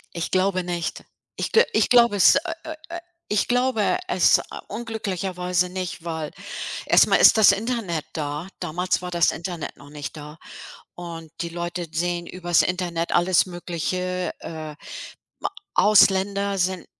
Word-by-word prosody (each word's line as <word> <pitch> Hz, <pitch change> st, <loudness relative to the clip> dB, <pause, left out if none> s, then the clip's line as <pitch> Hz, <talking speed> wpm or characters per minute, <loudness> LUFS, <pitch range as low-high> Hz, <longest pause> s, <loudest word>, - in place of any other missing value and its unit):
Ich 170 Hz, -, -3 dB
glaube 185 Hz, 0 st, +1 dB
nicht. 175 Hz, -1 st, -4 dB, 0.3 s
Ich -, -, -3 dB
g 460 Hz, -, +6 dB
ich -, -, +2 dB
glaube, 235 Hz, -3 st, +5 dB
es, 195 Hz, -, +6 dB
äh, 330 Hz, +5 st, 0 dB
äh, 315 Hz, -1 st, -6 dB
äh 340 Hz, +1 st, -5 dB, 0.3 s
ich 210 Hz, -1 st, +1 dB
glaube 245 Hz, -, +1 dB
es, 365 Hz, -, +4 dB
äh, -, -, -5 dB, 0.2 s
unglücklicherweise 185 Hz, -5 st, -2 dB
nicht, 180 Hz, -2 st, -5 dB
weil 160 Hz, -2 st, -3 dB, 0.6 s
erstmal -, -, +5 dB
ist -, -, +7 dB
das 215 Hz, -2 st, +7 dB
Internet 200 Hz, -7 st, -2 dB
da. 150 Hz, +2 st, -4 dB
Damals 180 Hz, +3 st, -1 dB
war 180 Hz, -, -5 dB
das 170 Hz, -2 st, +2 dB
Internet 170 Hz, -1 st, -6 dB
noch 145 Hz, -, -15 dB
nicht 145 Hz, +1 st, -7 dB
da 150 Hz, +1 st, -10 dB, 0.6 s
und 165 Hz, -2 st, -8 dB
die 170 Hz, -, -3 dB
Leute 175 Hz, 0 st, -4 dB
sehen 175 Hz, +1 st, -2 dB
übers 175 Hz, -2 st, +1 dB
Internet 175 Hz, -2 st, -2 dB
alles 175 Hz, +1 st, +3 dB
Mögliche, 180 Hz, +1 st, -3 dB
äh, 155 Hz, -2 st, -7 dB, 0.7 s
ma -, -, -2 dB, 0.2 s
Ausländer 200 Hz, -1 st, +4 dB
sind 185 Hz, 0 st, -1 dB
180 Hz, 150 wpm, -23 LUFS, 170-200 Hz, 0.7 s, ist